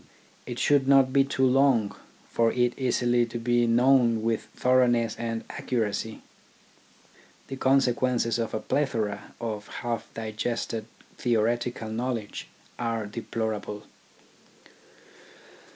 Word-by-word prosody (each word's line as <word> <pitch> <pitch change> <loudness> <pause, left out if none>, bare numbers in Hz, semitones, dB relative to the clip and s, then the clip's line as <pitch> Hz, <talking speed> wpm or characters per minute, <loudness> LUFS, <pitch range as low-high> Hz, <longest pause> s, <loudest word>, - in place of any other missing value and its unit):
It 120 -1 -5
should 140 -1 +3
not 135 -1 +5
be 140 - +5
too 135 -1 0
long 130 -5 +3 0.3
for 115 -1 +2
it 120 -1 +1
easily 120 -2 +2
to 120 - -5
be 120 0 +2
known 120 -1 +4
with 115 -1 -1
thoroughness 120 -3 +3
and 115 -1 -3
accuracy. 110 -2 -3 1.3
The 135 - -4
consequences 125 -3 +2
of 115 -1 -2
a - - -1
plethora 110 -5 -2
of 105 -3 -4
half 120 -1 -4
digested 110 0 -3 0.3
theoretical 120 0 0
knowledge 115 -2 -3 0.3
are 115 -2 -1
deplor 110 +1 -3
able. 105 0 -7
120 Hz, 110 wpm, -27 LUFS, 110-125 Hz, 1.3 s, not